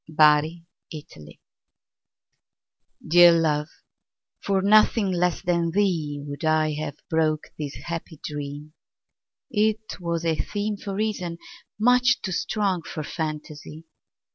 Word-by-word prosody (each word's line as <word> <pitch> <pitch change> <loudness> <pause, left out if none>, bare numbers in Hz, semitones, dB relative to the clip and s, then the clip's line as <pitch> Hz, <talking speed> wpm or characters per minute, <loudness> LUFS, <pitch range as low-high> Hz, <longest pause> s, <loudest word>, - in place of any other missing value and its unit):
The 155 +1 +3 0.3
Dream 80 - -11 1.7
DEAR 175 +1 +8
love, 155 -2 +1 0.7
for 195 -1 0
nothing 210 0 +4
less 180 -1 0
than 170 -1 +1
theeWould 150 -7 -1
I 155 -1 +2
have 150 -1 -4
broke 155 -3 0
this 145 -2 -5
happy 165 -2 -6
dream; 145 +1 -6 0.8
It 215 -1 0
was 170 -1 -3
a 160 -1 +1
themeFor 205 -1 -3
reason, 195 -5 -2 0.4
much 250 +2 +4
too 190 - -3
strong 190 0 -1
for 155 -1 -6
fantasy. 155 0 -6
165 Hz, 105 wpm, -24 LUFS, 150-195 Hz, 1.7 s, DEAR